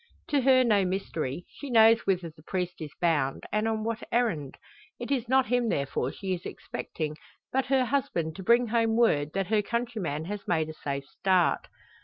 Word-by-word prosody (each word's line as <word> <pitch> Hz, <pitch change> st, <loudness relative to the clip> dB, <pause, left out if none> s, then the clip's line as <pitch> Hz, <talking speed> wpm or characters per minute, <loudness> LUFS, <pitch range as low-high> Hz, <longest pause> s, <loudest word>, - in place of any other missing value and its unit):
To 285 Hz, -2 st, +2 dB
her 260 Hz, 0 st, +5 dB
no 210 Hz, -5 st, +3 dB
mystery; 180 Hz, -5 st, -3 dB
she 285 Hz, -, -9 dB
knows 225 Hz, -2 st, +5 dB
whither 180 Hz, -4 st, 0 dB
the 155 Hz, -, -19 dB
priest 180 Hz, +2 st, -3 dB
is 155 Hz, -, -5 dB
bound, 150 Hz, -6 st, +1 dB
and 215 Hz, +1 st, +1 dB
on 220 Hz, -1 st, -1 dB
what 230 Hz, +1 st, -2 dB
errand. 180 Hz, -, 0 dB, 0.4 s
It -, -, -5 dB
is 250 Hz, -4 st, 0 dB
not 265 Hz, 0 st, +4 dB
him 245 Hz, 0 st, +1 dB
therefore 140 Hz, -4 st, -1 dB
she 190 Hz, -2 st, -3 dB
is 175 Hz, -1 st, -5 dB
expecting, 155 Hz, -2 st, -5 dB, 0.4 s
but 265 Hz, 0 st, +1 dB
her 265 Hz, -1 st, +3 dB
husband 230 Hz, -, -1 dB
to 190 Hz, -, -7 dB
bring 235 Hz, +3 st, +4 dB
home 225 Hz, -1 st, +2 dB
word 150 Hz, -11 st, +2 dB
that 195 Hz, -1 st, -1 dB
her 215 Hz, -1 st, +3 dB
countryman 210 Hz, -9 st, -3 dB
has 205 Hz, +2 st, -6 dB
made 160 Hz, -3 st, +1 dB
a -, -, -6 dB
safe 140 Hz, -2 st, -4 dB
start. 180 Hz, +4 st, +1 dB
200 Hz, 190 wpm, -28 LUFS, 160-235 Hz, 0.4 s, her